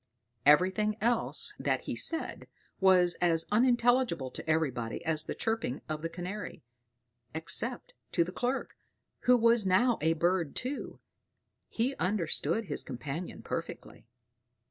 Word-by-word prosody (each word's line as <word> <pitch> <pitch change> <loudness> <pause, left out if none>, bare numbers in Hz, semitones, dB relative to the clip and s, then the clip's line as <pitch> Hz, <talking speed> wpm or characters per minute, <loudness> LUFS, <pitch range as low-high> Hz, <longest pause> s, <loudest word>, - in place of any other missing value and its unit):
Everything 190 +7 +4
else 235 +1 +1
that - - 0
he - - -4
said 325 -1 -1 0.3
was 185 -2 +5
as 165 -2 +3
unintelligible 240 - +2
to - - -7
everybody 130 -6 -1
as 155 -1 0
the - - -4
chirping 225 - -2
of 155 -1 -4
the 165 - -3
Canary, 180 +1 -6 0.7
except 235 +9 -2 0.2
to 170 - +3
the 175 - -6
clerk, 250 +7 -2 0.5
who 250 0 +6
was 230 -1 +4
now 220 +6 +3
a 160 +2 +3
bird 170 -1 0
too: 265 +3 -5 0.7
he 250 +4 -1
understood 185 +1 0
his 150 -6 -3
companion 140 +7 -6
perfectly. - - -6
185 Hz, 125 wpm, -30 LUFS, 160-230 Hz, 0.7 s, who